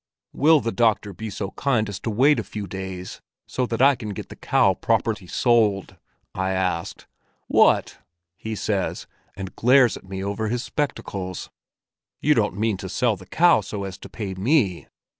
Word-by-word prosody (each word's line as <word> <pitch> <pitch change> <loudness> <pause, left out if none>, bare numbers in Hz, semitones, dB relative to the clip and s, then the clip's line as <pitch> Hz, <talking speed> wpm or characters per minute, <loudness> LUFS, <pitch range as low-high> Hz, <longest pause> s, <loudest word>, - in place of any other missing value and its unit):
'Will 155 0 +5
the 115 - -2
doctor 110 -4 +1
be 110 +5 -6
so 100 0 -5
kind 125 -6 0
as 100 -1 -5
to - - -4
wait 135 +7 +4
a - - -2
few 105 -1 -6
days 95 -1 -7 0.3
so 125 -1 -1
that 115 +2 0
I 140 +1 +7
can 110 -5 -6
get - - -7
the - - -9
cow - - +3
properly - - -1
sold?' 105 -6 +2 0.4
I 95 0 -1
asked. 90 -3 -2 0.4
'What!' - - +3 0.4
he 110 +3 -5
says, 100 -2 -2 0.3
and 95 -1 -7
glares 125 0 +4
at 95 - -15
me 95 0 -4
over 100 +2 -2
his 120 +3 -2
spectacles. 100 -8 -4 0.7
'You 150 - +3
don't 105 -6 0
mean 110 -1 0
to 95 0 -7
sell 115 +4 +1
the 95 -1 -14
cow 170 - +4
so 100 +1 -5
as 95 -1 -6
to - - -11
pay 100 -4 -5
me? 100 - +1
105 Hz, 180 wpm, -23 LUFS, 95-120 Hz, 0.7 s, I